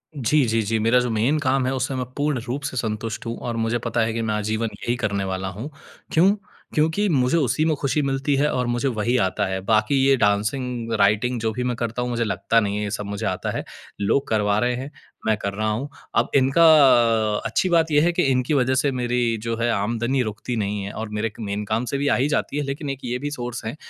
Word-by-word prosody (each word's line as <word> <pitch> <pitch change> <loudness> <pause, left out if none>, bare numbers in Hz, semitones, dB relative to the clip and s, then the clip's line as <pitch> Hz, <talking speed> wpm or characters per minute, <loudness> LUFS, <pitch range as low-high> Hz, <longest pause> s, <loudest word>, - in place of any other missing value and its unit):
जी, 140 +2 +2
जी, 115 -1 +1
जी, 110 +1 0
मेरा 115 +3 +4
जो 125 0 -1
मेन 115 +8 +1
काम 135 -2 +1
है, 130 - 0
उससे 130 +1 -2
मैं 130 -1 -2
पूर्ण 145 -2 0
रूप 130 +4 -3
से 135 -2 -4
संतुष्ट 110 +1 -3
हूँ 115 0 -4
और 120 - -2
मुझे 115 +1 0
पता 115 0 0
है 110 0 0
कि 115 - -2
मैं 110 -1 -1
आजीवन 110 +2 -1
यही 120 - 0
करने 100 -4 -1
वाला 95 0 -3
हूँ। 105 +10 -6 0.4
क्यों? 180 +5 +5 0.4
क्योंकि 160 +7 +2
मुझे 130 -1 +2
उसी 155 +1 +1
में 160 -1 +2
खुशी 140 +2 0
मिलती 135 +1 0
है 145 +2 +2
और 125 -1 -1
मुझे 120 +3 0
वही 120 -1 0
आता 100 +2 -1
है। 95 0 -2
बाकी 110 +6 +2
ये 135 0 +5
डांसिंग, 115 +3 0
राइटिंग, 110 +5 +2
जो 110 -1 0
भी 125 +3 -3
मैं 125 -1 -1
करता 120 +1 -3
हूँ, 125 - -2
मुझे 120 -1 0
लगता 115 +1 +1
नहीं 100 -2 -1
है, 105 - -2
ये 105 - -3
सब 105 0 -3
मुझे 100 +2 -4
आता 95 -1 -2
है, - - -3 0.4
लोग 135 +7 +1
करवा 105 -2 +1
रहे 125 +1 +1
हैं, 135 +4 -6 0.4
मैं 110 - +4
कर 100 -1 -3
रहा 110 +2 -2
हूँ। 115 +7 -2 0.3
अब - - +2
इनका 135 +5 +4 0.8
अच्छी 115 +11 0
बात 165 -2 +3
ये 145 0 +5
है 170 +3 +3
कि 180 - +1
इनकी 130 +3 +1
वजह 130 -2 +2
से 140 +2 +2
मेरी 120 -2 0
जो 115 0 -1
है, 120 +1 0
आमदनी 120 +5 0
रुकती 110 +2 -4
नहीं 105 -2 -2
है 100 - -5
और 110 0 -5
मेरे 105 +1 -1
एक 110 - -12
मेन 105 -1 -3
काम 110 +3 -1
से 140 - -2
भी 140 +1 -1
आ - - +3
ही 130 +3 +1
जाती 145 -1 -1
है, 145 - 0
लेकिन 140 +1 -4
एक 135 -1 -4
ये 125 0 -1
भी 145 +2 -4
सोर्स 120 -4 -5
हैं, 110 - -4
120 Hz, 250 wpm, -23 LUFS, 110-135 Hz, 0.8 s, क्यों